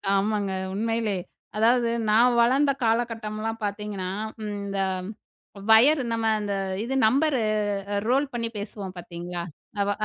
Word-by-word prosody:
ஆமாங்க. 200 0 0 0.2
உண்மையிலே 225 -1 0 0.4
அதாவது 235 +1 +4 0.2
நான் 240 +3 +5
வளர்ந்த 275 +4 +4
காலகட்டம்லாம் 225 -1 -1
பார்த்தீங்கன்னா, 205 -2 -3 0.3
ம், 210 -1 -3
இந்த 200 0 -2 0.9
வயர் 275 +7 +7
நம்ம 225 -1 0
இந்த 205 -1 -2 0.3
இது 260 +3 -2
நம்பரு 275 +2 +2 0.5
அ - - +1
ரோல் 270 +3 +3
பண்ணி 230 -1 -1
பேசுவோம் 200 -2 -6
பார்த்தீங்களா? 175 0 -6 0.4
அ - - +3
வ - - +3
220 Hz, 125 wpm, -25 LUFS, 205-240 Hz, 0.9 s, வயர்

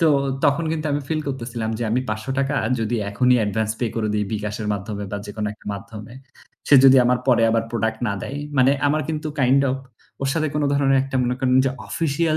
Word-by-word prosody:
তো 165 - +4 0.4
তখন 145 +4 +2
কিন্তু 155 -1 -2
আমি 145 - 0
feel 155 -1 0
করতেছিলাম 115 -4 -4
যে - - -3
আমি 120 +3 +1
৳৫০০ 135 +6 -2 0.3
যদি 115 +2 -1
এখনই 125 +4 +3
advance 110 +1 -1
pay 120 -3 0
করে 110 -1 0
দেই 105 0 0
bKash 105 -1 -3
এর 105 - -3
মাধ্যমে 100 +1 -5
বা 105 - -3
যেকোনো 105 +1 -4
একটা - - -23
মাধ্যমে 105 +2 -10 0.6
সে 145 - +6
যদি 135 0 +8
আমার 125 +1 +3
পরে 120 -3 +4
আবার 115 0 +2
product 110 -1 -1
না - - 0
দেয়। 140 - -5 0.2
মানে 130 +1 +5 0.2
আমার 150 +2 +2
কিন্তু 155 0 -3
kind 130 +1 +4
of 130 - -1 0.5
ওর 135 - 0
সাথে 155 -1 0
কোনো 150 -1 +1
ধরনের 135 -1 +3
একটা 135 0 -3
মনে 125 +1 0
করেন 130 -1 +2
যে - - +2 0.2
official 160 0 0
125 Hz, 215 wpm, -22 LUFS, 110-140 Hz, 0.6 s, যদি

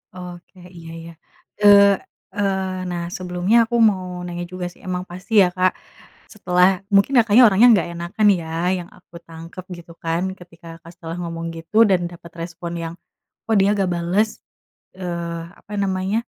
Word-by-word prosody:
Oke, 180 +1 -11 0.2
iya 165 -1 -11
iya. 165 +1 -10 0.5
Eee 200 -1 +8 0.4
eee, 190 -2 -2
nah, 175 -1 -3
sebelumnya 180 +4 0
aku 235 - -3
mau 180 -2 -5
nanya 175 0 -5
juga 185 -1 -5
sih, - - -22
emang 180 0 -2
pasti 185 +5 -9
ya - - +3
Kak, 185 0 +3 0.6
setelah, 185 -1 +2
mungkin 200 +7 +4
Kakaknya, 225 +2 +6
orangnya 210 +3 +5
nggak 180 - 0
enakan 175 +5 -1
ya 160 - -8 0.3
yang 175 - -8
aku 180 -1 -24
tangkep 165 +2 -10
gitu 170 0 -13
kan. 165 +1 -1 0.2
Ketika 170 -1 -16
Kakak 170 0 -14
setelah 165 -1 -7
ngomong 165 -1 -5
gitu, 210 +8 +3
dan 180 -3 +2
dapat 170 -1 -13
respon 170 0 -6
yang, 165 0 -5 0.5
"Kok 225 - +1
dia 195 0 +4
nggak 195 -3 0
bales?" 175 +5 +1 0.7
Eee, 170 -2 -4 0.2
apa 210 - -13
namanya, 195 +2 0
180 Hz, 160 wpm, -21 LUFS, 170-195 Hz, 0.7 s, Eee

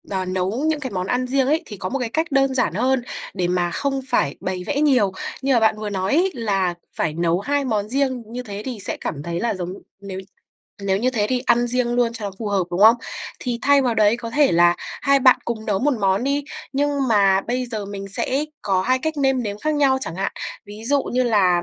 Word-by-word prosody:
n 185 -1 -2
nấu 190 +8 -1
những 315 -1 +1
cái 260 -4 -5
món 185 -1 -3
ăn 250 +3 0
riêng 265 0 +1
ấy 315 +4 +1
thì 210 - -8
có 185 - -4
một 275 - -2
cái 240 -3 -2
cách 320 +6 0
đơn 270 -1 +3
giản 250 - +1
hơn 265 0 +1 0.3
để 180 -2 -1
mà 175 -1 0
không 275 +8 -1
phải 140 - +1
bày 185 -1 -3
vẽ 290 0 0
nhiều, 255 -10 +3 0.3
như 270 0 +2
mà 235 - +5
bạn 220 -1 +3
vừa 215 -1 -3
nói 190 +1 -1
ấy 370 +3 +3
là 195 -6 0 0.2
phải 155 - -1
nấu 170 +1 +1
2 285 +6 0
món 210 -3 -1
riêng 260 -1 0
như 245 +3 -6
thế 205 -3 -6
thì 250 -4 -5
sẽ - - -2
cảm 145 -1 -4
thấy 170 +1 -3
là 235 -2 0
giống, 180 -1 -5 0.3
nếu 195 -1 -6 0.6
nếu 195 -1 +1
như 250 +4 +1
thế 215 -5 0
thì 255 -1 +1
ăn 240 -1 +2
riêng 240 0 0
luôn 240 -1 +2
cho 210 -3 -5
phù 225 - -4
hợp, 195 -3 +1
đúng 175 - -2
không? 220 +3 +8 0.4
Thì 245 -2 -3
thay 280 0 +5
vào 245 -3 +1
đấy 215 +1 +4
có 235 -1 -6
thể 290 +2 +3
là 175 +1 +5
hai 275 0 +1
bạn 255 -1 +7
cùng 220 -2 -4
nấu 205 -3 +1
1 285 +4 +2
món 195 +3 +2
đi 280 +1 0 0.3
nhưng 290 +1 +1 0.2
mà 195 -3 +4
bây 250 +4 -2
giờ 220 -4 -4
mình 195 0 -6
sẽ 265 +8 0 0.2
có 190 -2 +1
2 255 +5 +2
cách 315 +3 -3
nêm 270 -3 +2
nếm 205 -2 -4
khác 310 +6 -1
nhau 275 -3 +3
chẳng 165 -9 -4
hạn, 195 +1 -2 0.3
ví 210 +2 -10
dụ 280 +2 +2
như 255 +1 0
là 190 -7 +3
230 Hz, 245 wpm, -22 LUFS, 195-265 Hz, 0.6 s, không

